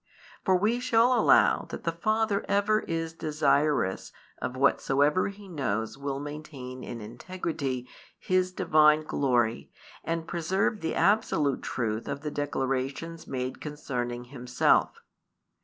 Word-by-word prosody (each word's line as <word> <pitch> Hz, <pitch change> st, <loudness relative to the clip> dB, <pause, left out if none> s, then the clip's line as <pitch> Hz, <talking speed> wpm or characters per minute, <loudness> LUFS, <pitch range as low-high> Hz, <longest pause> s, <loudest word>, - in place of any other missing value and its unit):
For 190 Hz, -, +3 dB
we 215 Hz, +6 st, +2 dB
shall 245 Hz, 0 st, +3 dB
allow 245 Hz, -, +4 dB
that -, -, -7 dB
the 165 Hz, -, 0 dB
Father 215 Hz, +4 st, 0 dB
ever 205 Hz, +2 st, +3 dB
is 165 Hz, -3 st, -3 dB
desirous 150 Hz, -8 st, +1 dB, 0.3 s
of 125 Hz, +1 st, -3 dB
whatsoever 140 Hz, +4 st, +3 dB
He 200 Hz, 0 st, -9 dB
knows 110 Hz, -, -2 dB
will 140 Hz, 0 st, -4 dB
maintain 145 Hz, -3 st, -7 dB
in 115 Hz, -, -6 dB
integrity 130 Hz, +1 st, -4 dB, 0.3 s
His 185 Hz, 0 st, +1 dB
Divine 155 Hz, -4 st, +4 dB
glory 120 Hz, -6 st, 0 dB, 0.3 s
and 165 Hz, 0 st, -3 dB
preserve 190 Hz, +5 st, 0 dB
the 160 Hz, -, -2 dB
absolute 175 Hz, -, +2 dB
truth 110 Hz, -2 st, -3 dB
of 140 Hz, 0 st, -4 dB
the 150 Hz, -1 st, -4 dB
declarations 140 Hz, +3 st, -3 dB
made 130 Hz, -1 st, -4 dB
concerning 125 Hz, -5 st, -4 dB
Himself. 125 Hz, -1 st, +1 dB
150 Hz, 125 wpm, -28 LUFS, 130-180 Hz, 0.3 s, allow